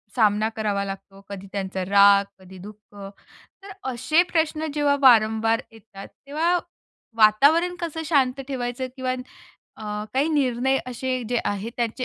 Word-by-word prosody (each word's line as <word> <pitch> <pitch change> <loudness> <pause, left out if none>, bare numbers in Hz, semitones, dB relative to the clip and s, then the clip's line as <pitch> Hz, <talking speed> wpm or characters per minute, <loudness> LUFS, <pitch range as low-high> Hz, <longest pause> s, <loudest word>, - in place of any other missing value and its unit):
सामना 215 -1 +2
करावा 205 -2 -1
लागतो. 195 0 -9
कधी 200 -1 -8
त्यांचा 190 -1 -4
राग, 200 +1 +5
कधी 190 0 -14
दुःख. 210 0 -16 0.7
तर 395 - -10 0.2
असे 255 +8 +2
प्रश्न 315 -1 0
जेव्हा 290 -1 +2
वारंवार 225 -2 +4
येतात, 220 -3 -13 0.2
तेव्हा 320 +5 0 0.6
वातावरण 285 +12 +4
कसं 330 -2 -4
शांत 275 -4 +1
ठेवायचं 255 -1 -4
किंवा 255 -1 -2 0.6
अ, - - -10 0.3
काही 275 +4 +1
निर्णय 265 -2 +1
असे 255 +1 -3
जे 245 0 0
आहेत 205 +3 -3
त्यांचे 240 +1 -2
240 Hz, 135 wpm, -23 LUFS, 210-280 Hz, 0.7 s, राग